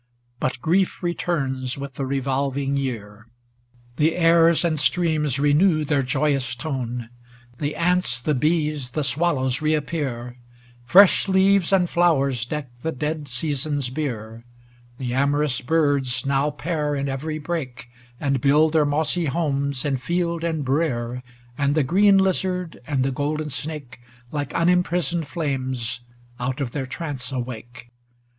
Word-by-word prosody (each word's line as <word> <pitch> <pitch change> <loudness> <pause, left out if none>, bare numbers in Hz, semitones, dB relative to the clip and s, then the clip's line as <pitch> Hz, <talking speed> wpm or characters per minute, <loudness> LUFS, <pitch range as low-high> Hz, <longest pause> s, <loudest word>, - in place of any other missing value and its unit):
But 130 -1 -1
grief 180 +5 +1
returns 135 -7 -2
with 140 -1 -6
the 135 0 -4
revolving 135 +1 -1
year; 115 -5 -4 0.7
The 155 +2 +2
airs 165 0 +4
and 160 -3 +1
streams 155 -5 +2
renew 155 +3 +3
their 145 -1 +2
joyous 135 -1 0
tone; 125 -4 -4 0.5
The 145 0 -2
ants, 180 -8 +1
the 150 +6 0
bees, 150 -1 0
the 150 +4 -2
swallows, 135 -2 +1
reap 155 -1 +1
pear; 125 -6 -4 0.5
Fresh 195 +8 +6
leaves 190 -1 +3
and 185 -2 +4
flowers 140 -9 +2
deck 130 -4 -5
the 160 - -2
dead 150 +1 -3
Seasons' 140 0 -1
bier; 115 -6 -4 0.5
The 125 -2 -3
amorous 140 0 +1
birds 140 -4 +1
now 140 +1 +2
pair 150 0 -2
in 140 0 -2
every 150 +3 -3
brake, 145 -6 -5 0.3
And 135 -3 0
build 150 +3 +4
their 155 -2 +4
mossy 155 +4 0
homes 140 -3 -1
in 140 -2 +1
field 170 +5 -1
and 160 -4 -1
brere; 125 -4 -1 0.4
And 140 0 +2
the 155 - +3
green 195 +8 +5
lizard 185 -2 0
and 140 -4 +1
the 135 - 0
golden 150 +3 -2
snake, 140 -2 -6 0.3
Like 145 -1 -4
unimprisoned 175 -1 +1
flames, 130 -7 -2 0.4
out 130 +2 -2
of 135 -4 -2
their 135 -1 -3
trance 140 -3 -5
awake. 120 -1 -6
145 Hz, 135 wpm, -23 LUFS, 130-160 Hz, 0.7 s, Fresh